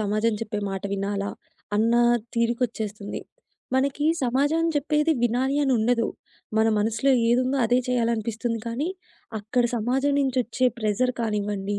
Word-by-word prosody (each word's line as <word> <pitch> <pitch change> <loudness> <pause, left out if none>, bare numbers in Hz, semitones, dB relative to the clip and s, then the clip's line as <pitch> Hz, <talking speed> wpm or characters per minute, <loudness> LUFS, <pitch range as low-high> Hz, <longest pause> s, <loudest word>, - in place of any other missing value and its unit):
సమాజం 215 +2 +1
చెప్పే 210 -1 -3
మాట‌ 195 -1 -4
వినాలా? 200 0 -2 0.5
అన్న 230 +2 +3 0.4
తీరుకొచ్చేస్తుంది. 230 -3 -2 0.5
మనకి 280 +2 +1 0.2
సమాజం 285 +6 +2
చెప్పేది 300 +2 +2
వినాలి 255 +4 +1
అని 270 -2 +2
ఉండదు. 230 +1 +2 0.5
మన 220 0 +4
మనసులో 225 +5 +2 0.2
ఏదుందో 255 +3 +2
అదే 245 +2 +3
చేయాలనిపిస్తుంది. 230 -1 -1
కానీ 245 +8 -2 0.5
అక్కడ 240 +4 0
సమాజం 260 +5 +1
నుంచి 265 -2 0
వచ్చే 255 +2 0
ప్రెషర్ 215 +4 +1
కానివ్వండి. 205 -2 -2
235 Hz, 120 wpm, -25 LUFS, 215-260 Hz, 0.5 s, మన